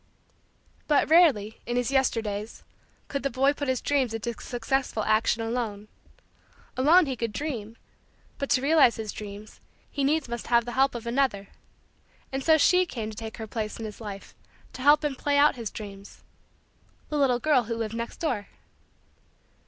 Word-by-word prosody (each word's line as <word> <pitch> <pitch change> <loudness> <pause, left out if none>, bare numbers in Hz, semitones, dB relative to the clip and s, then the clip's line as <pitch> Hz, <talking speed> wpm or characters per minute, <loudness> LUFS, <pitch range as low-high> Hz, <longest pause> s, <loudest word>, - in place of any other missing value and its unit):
But 300 0 +2
rarely, 265 - +4
in 240 - -2
his 245 +1 0
Yesterdays, 225 -5 -1 0.4
could 280 - -3
the 275 - -1
boy 270 +3 +2
put 285 -1 -4
his 260 -2 0
dreams 265 -6 0
into 235 +1 -3
successful 250 -2 -2
action 220 +1 +2
alone. 225 -3 -3 0.9
Alone 315 +7 +5
he 265 -2 -3
could 230 -2 -3
dream 230 -5 -5 0.6
but 280 - -3
to 255 - +2
realize 290 -4 +5
his 220 -2 -5
dreams, 210 0 -9 0.3
he 285 - -2
needs 300 +1 +1
must 235 0 -5
have 235 -1 +3
the 240 - -5
help 265 +1 +2
of 235 -1 -6
another. 235 -5 0 0.8
And 270 0 -3
so 320 +1 +5
she 360 +4 +4
came 220 -7 -5
to - - -10
take 220 0 -7
her 220 - -5
place 215 -1 -4
in 225 - -6
his 215 +1 -8
life, 200 -2 -8 0.4
to - - -8
help 295 +3 +5
him 290 - 0
play 285 +2 0
out 290 +1 +5
his 230 -4 -5
dreams 200 -1 -10 0.9
the 300 - -2
little 260 -3 +3
girl 270 -4 +3
who 230 +1 -3
lived 225 -1 -3
next 230 0 -5
door. 240 - -2
240 Hz, 175 wpm, -26 LUFS, 220-280 Hz, 0.9 s, Alone